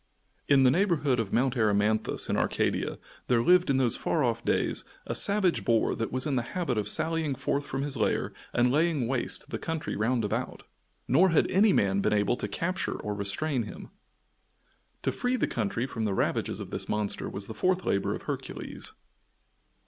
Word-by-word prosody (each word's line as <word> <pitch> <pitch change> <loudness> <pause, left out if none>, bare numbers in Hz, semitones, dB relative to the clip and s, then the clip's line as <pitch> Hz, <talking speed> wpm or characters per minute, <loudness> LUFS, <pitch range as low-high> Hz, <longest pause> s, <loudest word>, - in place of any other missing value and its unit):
In 140 -2 +5
the 125 - +6
neighborhood 150 - +2
of 110 -4 -2
Mount 130 +1 +1
Erymanthus, 105 -1 +1
in - - 0
Arcadia, - - 0 0.3
there 120 -2 +3
lived, 180 +1 +4
in 135 - +3
those 125 -4 +2
far 155 - 0
off 115 -2 0
days, - - 0 0.2
a - - -3
savage 200 -4 +2
boar 115 -2 +2
that 115 - -3
was 130 +2 0
in 140 -4 0
the - - +2 0.2
habit 165 -9 0
of 105 - +3
sallying 160 -4 +1
forth 140 +3 -2
from 135 +1 -3
his 145 -1 -1
lair 110 - 0 0.2
and 120 +1 +2
laying 150 -3 +1
waste 130 -1 -1
the - - -3
country 160 -1 -3
round 115 +1 0
about, 105 - -3 0.4
nor 175 +9 +5
had 165 - +3
any 200 +3 +5
man 100 - +2
been 105 - +1
able 105 +2 +2
to - - -3
capture 180 +2 -2
or 105 - -3
restrain 120 +8 -1
him. 105 - -8 1.1
To - - +1
free 250 +1 -1
the - - +1
country 115 +2 -2
from 120 -4 -4
the 100 -2 -1
ravages - - -1
of - - -7
this - - -4
monster 105 -1 -2
was 100 0 -4
the 110 - -7
fourth 185 +9 0
labor 100 0 0
of - - -9
Hercules. - - -6
130 Hz, 190 wpm, -28 LUFS, 110-160 Hz, 1.1 s, the